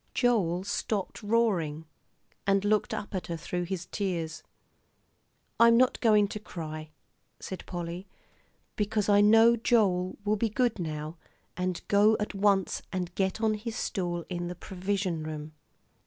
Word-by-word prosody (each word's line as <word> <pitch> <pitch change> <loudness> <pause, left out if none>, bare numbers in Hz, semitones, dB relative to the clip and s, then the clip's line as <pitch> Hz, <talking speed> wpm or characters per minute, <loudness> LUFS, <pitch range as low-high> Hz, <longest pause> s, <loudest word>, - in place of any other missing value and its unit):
Joel 195 -8 +2
stopped 205 0 -3
roaring, 200 -9 +1 0.6
and 195 0 +3
looked 210 0 +2
up 205 - -5
at 185 - -3
her 170 - -3
through 175 +2 -3
his 180 -1 -4
tears. 175 -4 -3 1.2
"I'm 230 0 +7
not 255 +1 +3
going 210 -3 +5
to 210 - -5
cry," 155 -6 -7 0.5
said 190 - -7
Polly, 175 +1 -5 0.7
"because 210 0 0
I 205 0 +6
know 225 +3 +6
Joel 200 -6 +2
will 210 +1 +2
be 225 +2 0
good 240 -1 0
now, 155 -1 -4 0.4
and 180 0 -2
go 210 +2 +5
at 210 - -3
once 195 -1 +2
and 180 -2 -3
get 190 +3 -1
on 220 -1 +3
his 220 +1 -5
stool 175 -3 -2
in 175 -1 -3
the 180 - -5
provision 185 -2 -2
room." 155 0 -6
195 Hz, 145 wpm, -29 LUFS, 175-215 Hz, 1.2 s, I'm